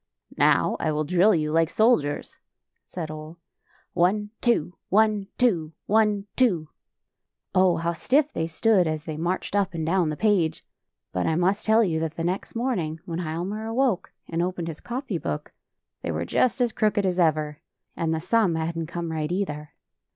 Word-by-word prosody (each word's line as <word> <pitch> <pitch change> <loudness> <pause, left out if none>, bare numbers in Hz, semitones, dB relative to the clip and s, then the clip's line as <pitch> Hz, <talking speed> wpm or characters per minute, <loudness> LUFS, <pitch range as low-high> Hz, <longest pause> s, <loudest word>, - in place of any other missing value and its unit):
" - - -23
Now - - +3
I 155 - 0
will 155 0 0
drill 180 +6 +4
you 155 -2 0
like 165 0 +3
soldiers," 190 -11 +1 0.5
said 160 -4 -6
Ole. 155 +2 -9 0.3
" - - -36
One, 205 +4 +1
two; 230 -8 +1 0.2
one, 210 -1 +3
two; 170 -11 +1
one, 210 -2 +2
two." 180 -12 +2 0.8
Oh, 185 -2 +4
how 170 +1 -1
stiff 280 - +1
they 160 - -1
stood, 185 +2 +3
as 155 0 -3
they 155 - -4
marched 175 +5 -2
up 195 -3 +1
and 160 -1 -2
down 175 -1 +2
the 155 - -3
page! 200 -7 +1 0.2
— - - -61
But 90 - 0
I 160 - +1
must 185 +6 +1
tell 220 +1 +5
you 165 -6 0
that 160 0 -3
the 165 - -3
next 180 +6 -3
morning 185 -11 -1
when 170 -2 -4
Hialmar 180 +6 -3
awoke 235 -3 0 0.2
and 165 0 -1
opened 175 -1 -2
his 155 - -7
copy 240 - -4
book, 75 - -4 0.5
they - - -4
were 80 +1 -2
just 255 - +1
as 240 -2 +2
crooked 210 -2 +1
as 185 -1 0
ever! 155 -3 +1 0.4
And 165 -1 -1
the 160 - +1
smn 185 0 +2
hadn't 165 0 -2
come 170 0 -4
right, 155 0 -2
either. 150 -6 -3
175 Hz, 185 wpm, -25 LUFS, 160-210 Hz, 0.8 s, tell